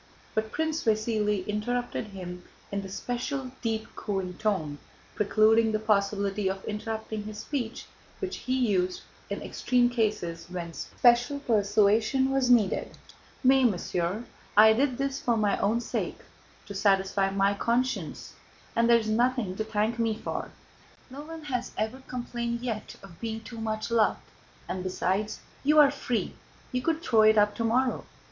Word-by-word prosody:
But 220 0 -1
Prince 320 +1 -1
Vasíli 215 -3 +1
interrupted 235 +3 -2
him 180 -3 -8 0.3
in 200 0 -1
the 195 - -8
special 250 +5 -3
deep 225 -2 -2
cooing 190 -3 -3
tone, 160 -9 -1 0.3
precluding 220 +2 +4
the 215 - +1
possibility 200 -1 +1
of 190 0 -5
interrupting 220 0 -4
his 215 0 -7
speech, 240 0 -4 0.3
which 385 -1 -4
he 255 +1 -1
used 185 -3 0 0.3
in - - -4
extreme 245 -1 +1
cases 210 -8 -1
when 175 -2 -5
special 245 - +2
persuasion 215 +3 +3
was 270 -2 +2
needed. 225 -6 +2 0.5
"Mais, 265 +1 +5
mon 200 -6 0
cher, 180 +5 -2 0.3
I 220 +1 +9
did 255 +1 +1
this 275 0 -2
for 235 -2 +1
my 210 -2 +2
own 215 +4 +2
sake, 240 - -3 0.4
to 200 - -8
satisfy 195 0 +2
my 195 +1 +2
conscience, 245 +5 -1 0.4
and 230 0 +3
there 235 - +8
is 220 -2 -2
nothing 235 -3 +1
to 220 - 0
thank 220 +2 -1
me 225 -2 +1
for. - - -4 0.6
No 275 +2 -7
one 320 +1 -9
has 250 -4 -3
ever 220 +5 -2
complained 235 -1 -3
yet 225 -4 -4
of 175 -4 -13
being 225 -1 -3
too 225 0 -8
much 220 +1 -3
loved; 225 -2 +2 0.4
and 185 0 -3
besides, 190 +3 -1 0.2
you 300 +2 +4
are 290 -2 +8
free, 250 -4 -2 0.4
you 250 -1 -1
could 325 +3 0
throw 225 -3 +4
it 215 0 +6
up 205 0 +4
tomorrow. 235 +4 +1
220 Hz, 155 wpm, -28 LUFS, 205-245 Hz, 0.6 s, I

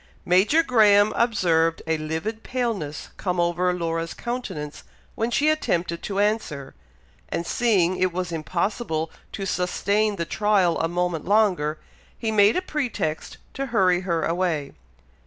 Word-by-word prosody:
Major 200 - +4
Graham 210 -6 +5
observed 165 -8 +2
a 160 -1 0
livid 160 +9 -4
paleness 225 - -3
come 180 -2 -2
over 175 +1 +1
Laura's 165 -1 -3
countenance 190 -12 -5 0.3
when 225 +1 -1
she 280 +5 +1
attempted 175 - 0
to 195 - -4
answer, 200 -10 -1 0.6
and 170 - -2
seeing 185 -5 +2
it 185 0 +1
was 180 0 -3
impossible 165 0 -2 0.2
to 195 - -4
sustain 200 +3 0
the 170 -3 -3
trial 200 -4 +2
a 165 - +1
moment 175 -2 -2
longer, 185 -7 +2 0.4
he 225 -2 -2
made 205 0 +5
a 365 - -1
pretext 245 - -3 0.2
to 275 0 -3
hurry 190 -7 +3
her 170 -3 -1
away. 165 -5 -1
185 Hz, 140 wpm, -24 LUFS, 165-215 Hz, 0.6 s, Graham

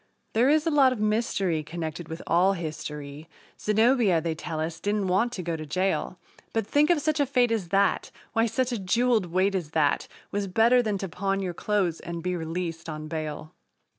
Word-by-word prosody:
There 240 +4 +4
is 310 +1 +3
a 330 - +1
lot 275 -3 +5
of 250 - -3
mystery 210 -6 0
connected 160 +1 -6
with 160 +1 -6
all 185 +3 +3
history 150 -3 -6 0.3
Zenobia, 220 -3 +3
they 165 0 -2
tell 160 0 -5
us, 160 +1 -3
didn't 205 -2 -1
want 200 +7 +2
to 185 - -4
go 170 -1 -2
to 155 - -6
jail, 185 +3 -1 0.4
But, 225 -2 0
think 290 - +3
of 345 -3 +4
such 310 +1 0
a 285 - +4
fate 245 -3 +2
as 215 -6 -1
that! 195 +1 +2 0.2
Why, 225 +1 +3
such 255 +3 0
a 235 - -2
jeweled 220 +1 +2
weight 185 +3 +1
as 175 -6 -2
that 145 -2 +2 0.2
Was 200 0 -1
better 230 +6 +4
than 215 -4 -1
to 195 - -4
pawn 195 +4 -1
your 185 -2 -3
clothes 185 -3 0
and 170 -1 -6
be 180 0 -1
released 165 0 -4
on 155 0 -6
bail! 155 -1 -5
190 Hz, 200 wpm, -26 LUFS, 165-225 Hz, 0.4 s, lot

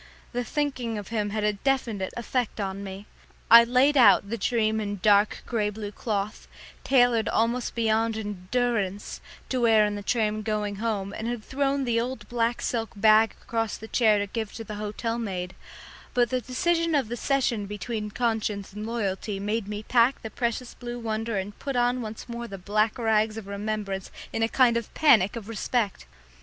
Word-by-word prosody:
The 245 0 -1
thinking 255 -4 -2
of 205 - -7
him 210 -2 -1
had 215 +1 -2
a 210 0 +2 0.2
strange 225 -6 -6 0.2
effect 240 -1 -2
on 195 0 -3
me. 195 +1 -7 0.5
I 230 - +12
had 235 - +3
laid 260 +4 +4
out 235 -5 +6
the 230 - -1
dream 220 0 +1
in 205 -1 -3
dark 205 0 +4
grey 215 -3 0
blue 210 0 -6
cloth, 210 -1 -3 0.4
tailored 245 -4 +3
almost 235 +2 0
beyond 225 -1 +1
endurance, 205 0 -2 0.3
to 255 -2 0
wear 220 -2 +5
in 210 - -1
the 205 - -4
train 215 0 0
going 210 -2 -2
home, 205 -3 -2
and 220 - -4
had 240 -2 -3
thrown 275 +2 0
the 230 -2 +1
old 255 +2 -5
black 235 0 0
silk 225 -2 -2
bag 215 +1 +5
across 225 -2 -2
the 220 - -9
chair 220 -3 +3
to 205 - 0
give 220 +1 -4
to 225 - -6
the 215 - -7
hotel 225 +2 -3
maid, 185 -5 -4 0.6
but 245 -1 +3
the 255 -1 0
decision 330 +7 +1
of 275 -6 +1
the 240 - -4
session 240 -5 0
between 210 +1 -4
conscience 215 -3 -2
and 210 +1 -5
loyalty 205 -3 -2
made 210 +1 -2
me 210 0 -5
pack 240 +3 +3
the 220 - -6
precious 235 +1 -2
blue 240 -1 -6
wonder 225 -1 -2
and 200 +2 -5
put 275 -2 -4
on 245 +1 +2
once 220 0 -7
more 235 0 -5
the 195 - -7
black 210 +4 0
rags 220 -2 +1
of 220 - -6
remembrance 200 -1 -4 0.2
in 225 - -1
a 225 - +2
kind 240 -2 +4
of 235 - -5
panic 240 -10 +5
of 225 -3 -7
respect. 225 - -2
220 Hz, 190 wpm, -26 LUFS, 210-240 Hz, 0.6 s, I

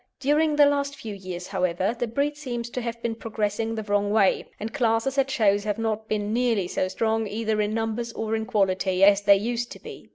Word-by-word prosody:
During 300 +3 +2
the 295 -1 +7
last 280 0 0
few 220 -6 -7
years, 185 -2 -7
however, 185 +2 0
the 240 - 0
breed 280 +6 -1
seems 240 -5 -5
to 250 - -3
have 235 0 -4
been 235 - -1
progressing 225 0 -2
the 220 - -3
wrong 205 -1 0
way, 205 -2 +2
and 220 +2 -5
classes 245 +1 +1
at 270 0 +2
shows 205 -5 +2
have 210 0 -2
not 220 -1 -2
been 210 0 -1
nearly 230 -6 +1
so 185 - -1
strong, 220 +2 0
either 215 +1 -1
in 210 +1 -1
numbers 225 +1 -2
or 225 0 -2
in 220 0 -3
quality, 190 -4 +1
as 200 0 +6
they 200 -1 +6
used 235 +3 -2
to - - -13
be. - - -11
220 Hz, 220 wpm, -25 LUFS, 205-240 Hz, -, the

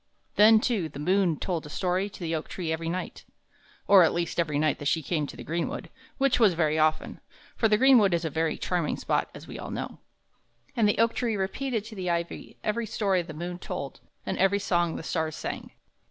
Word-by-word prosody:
Then, 220 +1 +7
too, 215 -8 0
the - - -11
moon 180 +1 +2
told 175 -4 -2
a 150 - -10
story 185 +4 -1
to - - -13
the 165 -1 -2
oak 160 -1 -3
tree 170 -4 -4
every 165 0 -3
night, 180 +2 -5 0.6
or 200 -2 +8
at 165 - +4
least 170 0 -2
every 155 -3 +1
night 150 -1 +1
that 145 - -3
she 160 +2 +1
came 150 -1 -1
to - - -10
the - - -8
greenwood, 170 +1 -3 0.3
which 275 -2 +2
was 210 -7 +5
very 155 -2 +1
often, 155 0 +1 0.4
for 225 - +3
the 210 -1 +3
greenwood 245 -6 +6
is 170 0 -2
a 160 - -2
very 160 +1 0
charming 175 -4 -1
spot, - - 0
as - - -10
we - - -8
all - - -6
know. - - -5 0.8
And 220 -4 +3
the - - +1
oak 230 0 +3
tree 235 -3 -1
repeated 220 +4 -2
to 220 0 -9
the 185 -2 -3
ivy 170 0 -3
every 225 +1 -1
story 195 -4 +1
the 160 -3 -9
moon 175 +2 -5
told 140 -6 -6 0.3
and - - -3
every 195 +1 +4
song 175 -4 0
the - - -6
stars 160 -1 -2
sang. - - -5
180 Hz, 220 wpm, -27 LUFS, 160-210 Hz, 0.8 s, or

